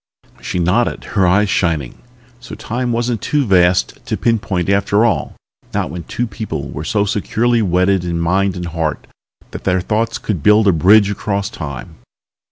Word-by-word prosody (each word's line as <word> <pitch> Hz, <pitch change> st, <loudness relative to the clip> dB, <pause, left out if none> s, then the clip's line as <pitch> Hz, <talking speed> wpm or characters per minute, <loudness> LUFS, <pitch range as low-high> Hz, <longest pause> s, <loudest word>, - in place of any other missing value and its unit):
She -, -, -4 dB
nodded, 90 Hz, +8 st, +1 dB
her 95 Hz, -3 st, +3 dB
eyes 105 Hz, +4 st, +3 dB
shining. 80 Hz, -8 st, -1 dB, 0.4 s
So 120 Hz, -3 st, -9 dB
Time 120 Hz, +3 st, -3 dB
wasn't 120 Hz, -2 st, -1 dB
too 145 Hz, -2 st, 0 dB
vast 90 Hz, -3 st, +2 dB
to -, -, -1 dB
pinpoint 100 Hz, -6 st, 0 dB
after 100 Hz, +2 st, +2 dB
all, 115 Hz, -, -1 dB, 0.4 s
not -, -, -1 dB
when 85 Hz, -1 st, -7 dB
two 120 Hz, -, -2 dB
people 110 Hz, 0 st, -5 dB
were 75 Hz, -, -6 dB
so 105 Hz, +4 st, 0 dB
securely 115 Hz, +4 st, 0 dB
wedded 90 Hz, -1 st, +2 dB
in 85 Hz, -1 st, -2 dB
mind 95 Hz, +3 st, +1 dB
and 90 Hz, -1 st, -5 dB
heart 80 Hz, -2 st, -3 dB, 0.5 s
that -, -, -8 dB
their 90 Hz, 0 st, +1 dB
thoughts 110 Hz, +5 st, -1 dB
could 95 Hz, -8 st, -3 dB
build 105 Hz, +6 st, +4 dB
a -, -, +6 dB
bridge 100 Hz, +5 st, +5 dB
across 100 Hz, 0 st, -2 dB
Time. 70 Hz, -5 st, -7 dB
100 Hz, 170 wpm, -17 LUFS, 90-110 Hz, 0.5 s, a